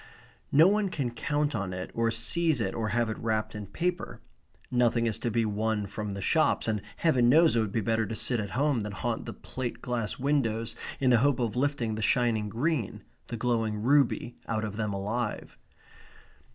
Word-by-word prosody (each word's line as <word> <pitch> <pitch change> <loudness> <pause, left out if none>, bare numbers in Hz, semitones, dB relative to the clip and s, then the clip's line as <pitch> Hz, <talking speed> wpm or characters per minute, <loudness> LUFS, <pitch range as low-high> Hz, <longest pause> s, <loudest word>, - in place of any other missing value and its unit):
No 155 +5 +7
one 205 0 +2
can 135 -8 -2
count 145 +5 -1
on 95 -5 -3
it 90 0 -5
or 115 0 +1
seize 140 +7 +2
it 95 -4 -1
or 110 -1 -2
have 120 +1 +1
it 110 - -4
wrapped 110 -1 -1
in 105 -2 -6
paper. 175 - -3 0.5
Nothing 120 -1 +2
is 110 -2 -1
to 120 - -1
be 115 0 +1
won 105 0 -1
from 105 +1 -5
the 100 -1 -5
shops, 155 - +2
and 105 -2 0
Heaven 130 -8 +3
knows 160 +1 +5
it - - +3
would 110 -3 -1
be 110 - 0
better 110 +1 0
to 115 - -4
sit 120 +2 +1
at 100 -2 -3
home 145 -2 +2
than 105 -1 -4
haunt 95 - -3
the - - -5
plate 130 -2 -6
glass 120 -4 -3
windows 115 -5 0 0.2
in 130 -2 +3
the 120 - +5
hope 140 +1 +3
of 115 -4 -1
lifting 125 -4 0
the 110 - -4
shining 110 -1 +1
green, 125 0 -2 0.2
the 120 - -5
glowing 115 -2 0
ruby, 130 -2 +2
out 110 -1 -1
of 105 -2 -4
them 105 -1 -2
alive. 105 +4 -3
115 Hz, 200 wpm, -28 LUFS, 110-130 Hz, 0.5 s, No